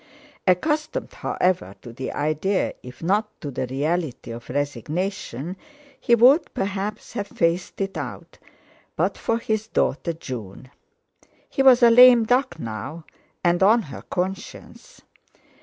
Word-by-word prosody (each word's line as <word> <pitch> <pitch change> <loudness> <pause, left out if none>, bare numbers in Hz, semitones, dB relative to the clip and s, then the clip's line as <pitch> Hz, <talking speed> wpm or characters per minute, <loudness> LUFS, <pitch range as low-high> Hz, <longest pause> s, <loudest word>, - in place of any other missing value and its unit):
Accustomed, 300 - 0
however, 170 - -1
to 120 - -9
the 130 +2 -5
idea, 155 +6 0
if 125 +3 -12
not 205 +5 +1
to 145 - -6
the 130 0 -3
reality 145 0 -2
of 115 +1 -9
resignation, 145 - -3 0.4
he 235 - +4
would 255 +8 +5
perhaps 200 +2 -3
have 205 - -3
faced 170 +1 -1
it 195 0 -2
out - - -7 0.6
but - - 0
for 230 - -1
his 220 -1 -2
daughter 170 -5 0
June. 125 - -8 0.8
He - - -1
was 260 -2 +6
a 235 - +8
"lame 245 -1 +8
duck" 250 -3 +1
now, 115 +6 -6 0.4
and 175 0 +2
on 220 +4 +5
her - - -8
conscience. 190 +2 -6
180 Hz, 130 wpm, -23 LUFS, 145-220 Hz, 0.8 s, a